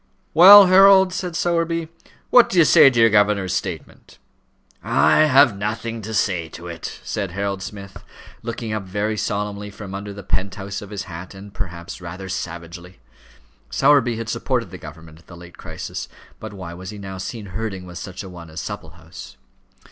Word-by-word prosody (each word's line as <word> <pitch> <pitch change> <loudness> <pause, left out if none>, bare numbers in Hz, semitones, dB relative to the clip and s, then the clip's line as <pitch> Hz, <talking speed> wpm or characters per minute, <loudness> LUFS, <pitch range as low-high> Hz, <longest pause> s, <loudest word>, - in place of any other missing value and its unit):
"Well, 195 +5 +10
Harold," 190 0 +6
said 180 -2 -4
Sowerby, 165 -1 -1 0.4
"what 245 -1 +6
do 185 - -2
you 165 - +7
say 140 - +7
to 120 -3 -1
your 115 -1 +5
governor's 105 -3 +2
statement?" 90 -5 -6 0.7
"I 155 - +4
have 135 -6 +5
nothing 110 +3 -4
to 110 +2 -7
say 90 -4 0
to 85 - -11
it," 85 -2 -7
said 100 -3 -3
Harold 100 0 -3
Smith, 100 0 -9 0.4
looking 115 -1 -5
up 110 - -2
very 100 +3 -3
solemnly 105 0 -3
from 100 -1 -10
under 100 +1 -6
the 100 0 -10
penthouse 95 +1 -4
of 105 - -10
his 105 -2 -5
hat, 90 +1 -9
and, 100 +1 -12
perhaps, 85 -4 -7
rather 90 +2 -8
savagely. 85 +1 -7 0.7
Sowerby 130 -5 +3
had 115 0 -6
supported 115 -2 -2
the 90 - -9
government 80 +1 -12
at 85 - -24
the 85 - -12
late 85 0 -14
crisis; - - -7 0.3
but 110 - -8
why 95 -4 -8
was 90 +1 -9
he 105 - -8
now 95 -2 -8
seen 105 +3 -6
herding 100 -3 -5
with 90 -1 -9
such 95 0 -8
a - - -9
one 85 -2 -11
as 80 +2 -8
Supplehouse? 80 -4 -9
100 Hz, 180 wpm, -21 LUFS, 90-115 Hz, 0.7 s, Well